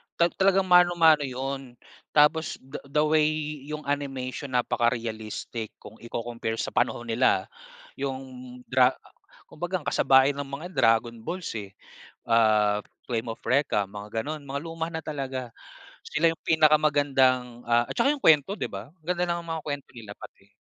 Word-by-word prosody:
ta 170 0 +3
talagang 195 0 +4
mano-mano 175 -4 +5
'yon. 135 0 -5 0.4
Tapos 150 +1 +4
the 135 +3 -8
the 150 +2 +2
way 155 0 +3 0.4
'yong 150 0 -5
animation, 135 -2 -3
napaka-realistic 115 -2 -2
kung 110 +2 -12
iko-compare 115 -1 -4
sa - - -3
panahon 120 - 0
nila 115 -5 +3 0.6
'yong 135 -1 -3 0.5
Dra 130 0 +4 0.6
kumbaga 175 +4 -4
ang - - -16
kasabay 135 +1 +4
ng 140 0 -5
mga 140 +5 -6
'yan - - -18
Dragon 115 +1 +3
Balls, 170 +10 -5
eh, 100 -1 -10 0.5
ah, 105 -2 +3 0.2
Flame 115 -1 -2
of 115 - -6
Recca, 125 -7 +2
mga 105 +3 -5
gano'n. 155 0 -5
Mga 140 0 -4
luma 165 0 -4
na 160 - -4
talaga. 130 -6 -5 0.5
Sila 165 +2 +2
'yong 165 - -5
pinakamagandang, 145 -6 +3
ah 120 0 +2
at - - -6
saka 275 +5 +3
'yong 290 - -7
kuwento, 155 +4 +5
'di - - -4
ba? 105 +9 -8
Ang 165 -4 -32
ganda 180 +1 0
ng 170 0 -2
mga 165 -2 -4
kuwento 145 -2 -5
nila 105 -3 -9
pati 100 0 -15
135 Hz, 155 wpm, -26 LUFS, 115-155 Hz, 0.6 s, mano-mano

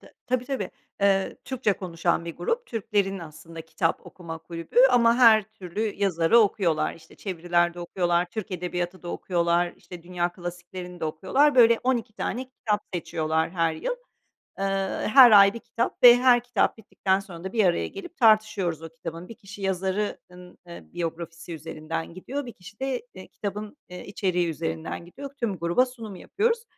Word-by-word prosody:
t - - -17
tabii, 250 0 0
tabii. 250 -8 -3 0.3
Eee, 195 -1 +2
Türkçe 255 -6 0
konuşan 170 -2 -1
bir 170 - -7
grup, 475 +1 -2
Türklerin 200 -3 -1
aslında 165 0 -10
kitap 165 +1 -2
okuma 165 -3 -8
kulübü 165 +2 -9
ama 235 -2 +5
her 225 -3 +7
türlü 200 -3 -8
yazarı 190 +1 +3
okuyorlar, 195 -7 +2
işte, 165 - -17
çeviriler 175 -2 0
de 175 - -8
okuyorlar, 175 0 0
Türk 220 -2 -5
edebiyatı 180 0 -4
da 175 - -7
okuyorlar, 175 -1 0
işte, 175 -2 -12
dünya 175 0 -1
klasiklerini 180 0 -8
de - - -2
okuyorlar. 260 - +2
Böyle, 235 -2 +6
12 245 -4 0
tane 255 +4 -4
kitap 215 -5 -2
seçiyorlar 160 -2 -1
her 165 -2 +1
yıl. - - -3 0.6
Eee, 195 - -1 0.5
her 260 -3 +10
ay 200 -2 +8
1 235 - -5
kitap 235 - -3
ve 245 -1 +10
her 245 -1 +5
kitap 245 -3 +1
bittikten 195 -2 0
sonra 180 -3 -11
da 190 - -5
bir 220 -3 +3
araya 175 -2 +2
gelip 360 -3 -10
tartışıyoruz 215 - +3
o 165 - -7
kitabın. 165 +1 -8
1 230 - -9
kişi 200 0 -12
yazarı 190 +2 -1
ııı, 180 0 -14
eee, 170 0 -10
biyografisi 165 0 -5
üzerinden 160 +1 -6
gidiyor, 260 +9 -5
1 240 - -7
kişi 200 +4 -15
de, 265 -2 -2
eee, 185 - -10
kitabın, 210 +3 -6
eee, 180 0 -9
içeriği 180 -3 0
üzerinden 160 +1 -4
gidiyor. 275 +11 -9
Tüm 210 -6 -1
gruba 170 +10 +2
sunum 230 -6 -9
yapıyoruz. 460 - -1
185 Hz, 170 wpm, -26 LUFS, 170-225 Hz, 0.6 s, her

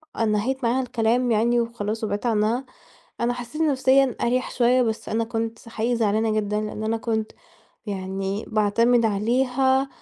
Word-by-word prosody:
أ 225 - 0
نهيت 225 +5 0
معاها 240 +3 +2
الكلام 245 0 +1
يعني 235 +2 +2
وخلاص 225 -2 -3
وبعدت 205 +1 -2
عنها 230 +3 +1 0.6
أنا 235 +1 +1
حسيت 245 +5 -5
نفسيًا 270 -3 +3
أريح 250 +2 0
شوية، 250 +1 +3
بس 225 -2 -2
أنا 225 +1 0
كنت 225 0 -4
حقيقي 230 +2 -1
زعلانة 220 0 +1
جدًا 210 -1 0
لأن 215 0 -5
أنا 220 +1 0
كنت 220 -1 -2 0.5
يعني 195 +1 -3
باعتمد 230 +3 +3
عليها 255 +5 +1
230 Hz, 150 wpm, -24 LUFS, 215-245 Hz, 0.6 s, نفسيًا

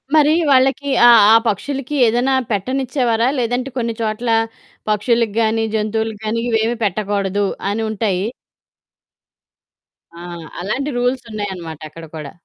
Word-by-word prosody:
మరి 300 0 +5 0.2
వాళ్ళకి 270 +2 +3 0.2
ఆ, - - +9 0.2
ఆ - - +8
పక్షులకి 275 +7 -2
ఏదైనా 240 +4 +2 0.2
పెట్టనిచ్చేవారా? 245 +1 0
లేదంటే 245 +2 -1
కొన్ని 230 -2 -1
చోట్ల 220 +2 -2 0.6
పక్షులకి 220 0 +1
గాని, 225 0 +1
జంతువులకి 220 0 -2
గాని 220 +2 -1
ఇవేమి 225 +1 +1
పెట్టకూడదు 200 0 -1 0.3
అని 225 +2 -2
ఉంటాయి. 200 -3 -1 1.9
ఆ! - - -9 0.4
అలాంటి 255 +10 -2
రూల్స్ 245 +1 0
ఉన్నాయనమాట 185 -7 -5
అక్కడ 165 +2 -11
కూడా. 150 -3 -7
225 Hz, 115 wpm, -18 LUFS, 205-250 Hz, 1.9 s, ఆ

